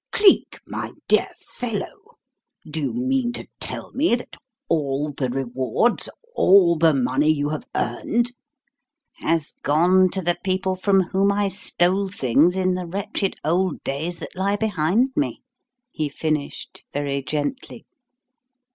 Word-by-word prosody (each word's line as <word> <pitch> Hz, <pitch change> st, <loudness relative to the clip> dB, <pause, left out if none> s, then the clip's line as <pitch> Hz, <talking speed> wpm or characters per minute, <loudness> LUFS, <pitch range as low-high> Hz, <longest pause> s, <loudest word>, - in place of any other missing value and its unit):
Cleek, 405 Hz, -2 st, +4 dB
my -, -, -5 dB
dear -, -, +3 dB
fellow, 245 Hz, -, -6 dB, 0.5 s
do 155 Hz, +1 st, -4 dB
you 140 Hz, -, -1 dB
mean 255 Hz, 0 st, 0 dB
to -, -, -7 dB
tell -, -, -6 dB
me 275 Hz, -3 st, +3 dB
that 245 Hz, -, -8 dB, 0.3 s
all 145 Hz, -2 st, 0 dB
the 135 Hz, -2 st, -2 dB
rewards, 130 Hz, -, 0 dB, 0.3 s
all 185 Hz, -3 st, +6 dB
the 160 Hz, 0 st, +4 dB
money 135 Hz, +1 st, +1 dB
you 145 Hz, -2 st, +1 dB
have 155 Hz, 0 st, -4 dB
earned 235 Hz, -, 0 dB, 0.5 s
" -, -, -59 dB, 0.2 s
"Has 165 Hz, -2 st, -1 dB
gone 180 Hz, +6 st, +4 dB
to 190 Hz, -1 st, -2 dB
the 175 Hz, +1 st, 0 dB
people 190 Hz, 0 st, 0 dB
from 195 Hz, +1 st, +3 dB
whom 195 Hz, +3 st, +2 dB
I 200 Hz, 0 st, +1 dB
stole 190 Hz, 0 st, +1 dB
things 160 Hz, 0 st, +3 dB
in 185 Hz, -1 st, +1 dB
the 180 Hz, -1 st, -3 dB
wretched 195 Hz, +1 st, -2 dB
old 175 Hz, +1 st, 0 dB
days 160 Hz, +6 st, -3 dB
that -, -, -9 dB
lie 195 Hz, +2 st, +1 dB
behind 210 Hz, -, +1 dB
me," 295 Hz, -, -1 dB, 0.5 s
he 155 Hz, -, -2 dB
finished 150 Hz, 0 st, -3 dB
very 140 Hz, -1 st, -2 dB
gently. 150 Hz, -, -4 dB
180 Hz, 140 wpm, -23 LUFS, 150-200 Hz, 0.5 s, all